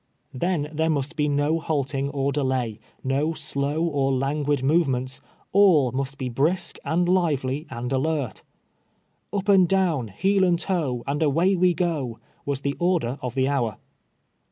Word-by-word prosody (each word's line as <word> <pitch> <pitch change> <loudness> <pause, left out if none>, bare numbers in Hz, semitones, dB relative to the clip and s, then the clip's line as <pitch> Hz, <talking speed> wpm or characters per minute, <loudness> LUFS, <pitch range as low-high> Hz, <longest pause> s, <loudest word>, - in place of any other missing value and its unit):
Then 150 +1 -1
there 160 +1 +1
must 145 +1 -1
be 150 -2 +1
no 145 +3 +1
halting 140 -3 -1
or 140 -1 -1
delay, 130 -6 -1 0.2
no 140 +5 0
slow 150 +1 -2
or 140 -5 +1
languid 140 +1 0
movements; 135 -4 +1 0.3
all 175 -10 +5
must 135 +2 -3
be 130 - -3
brisk, 160 +9 0
and 175 +2 +1
lively, 150 -6 0
and 125 +1 -4
alert. 140 -2 -1 0.5
" - - -45
Up 200 -1 -2
and 190 -3 +6
down, 175 -11 +1
heel 190 - +1
and 175 -2 +3
toe, 155 -10 -1
and 140 +2 -2
away 165 +6 +3
we 180 -1 +3
go," 150 -10 -1 0.3
was 140 -1 -1
the 140 0 -1
order 170 -8 0
of 125 -1 -4
the 130 0 +2
hour. 125 -7 0
145 Hz, 155 wpm, -24 LUFS, 135-170 Hz, 0.5 s, and